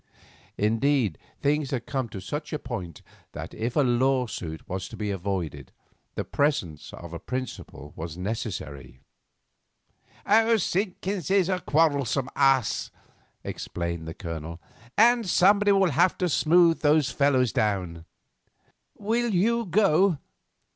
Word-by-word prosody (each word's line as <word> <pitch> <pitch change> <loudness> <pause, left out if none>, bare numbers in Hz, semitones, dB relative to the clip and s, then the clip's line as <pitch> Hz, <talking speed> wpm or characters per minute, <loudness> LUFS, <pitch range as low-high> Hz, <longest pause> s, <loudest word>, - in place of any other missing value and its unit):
Indeed, 115 - +1 0.2
things 145 0 +1
had 125 -4 -3
come 130 -4 -2
to 100 - -7
such 150 - -5
a - - 0
point 105 - -7 0.3
that - - -7
if 115 +2 -3
a 150 - +4
lawsuit 125 - 0
was 95 +1 -4
to - - -10
be 105 -1 -2
avoided 90 -8 -4 0.4
the - - -2
presence 100 - -1
of 85 -1 -10
a 85 - -5
principal 125 - -6
was 80 0 -6
necessary. 90 - -5 1.6
"Simpkins 190 -2 -2
is 195 -2 +3
a 185 -1 0
quarrelsome 140 -5 +1
ass," 135 -4 +2 0.5
explained 85 -2 -5
the 80 - -6
Colonel, 85 -1 -6 0.4
"and 235 -2 +4
somebody 205 +3 +4
will 195 -3 +3
have 175 +7 +3
to 180 - 0
smooth 165 +2 +4
those 150 -3 +3
fellows 130 -4 +2
down. 90 -6 -1 0.9
Will 230 +3 0
you 225 +4 +1
go? 190 -2 +3
130 Hz, 125 wpm, -26 LUFS, -, 1.6 s, a